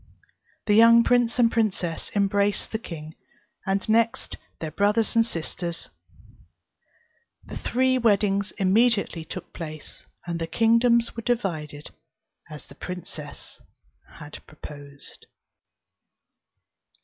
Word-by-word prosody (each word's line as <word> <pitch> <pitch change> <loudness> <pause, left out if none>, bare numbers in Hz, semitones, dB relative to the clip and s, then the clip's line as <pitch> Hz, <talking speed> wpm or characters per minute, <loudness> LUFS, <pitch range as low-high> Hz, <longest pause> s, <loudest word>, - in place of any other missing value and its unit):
The 210 - +3
young 230 +2 +7
prince 245 -1 +2
and 235 -2 +4
princess 195 -7 -1
embraced 200 0 +1
the 220 - -2
king, 160 -6 -8 0.5
and 195 0 0
next 230 +1 +1 0.2
their 160 -1 -4
brothers 210 +7 +1
and 230 - +6
sisters; 170 -4 -5 1.6
the - - -9
three 260 +1 +1
weddings 200 -3 +2
immediately 200 -3 +2
took 175 +2 -8
place; 155 -2 -9 0.2
and 170 -1 -3
the 165 - -3
kingdoms 230 +4 +3
were 230 - -4
divided 160 -11 -3 0.6
as 150 -1 -10
the - - -13
princess 170 -5 -8 0.6
had 150 0 -10
proposed. 145 -2 -11
200 Hz, 105 wpm, -25 LUFS, 165-230 Hz, 1.6 s, young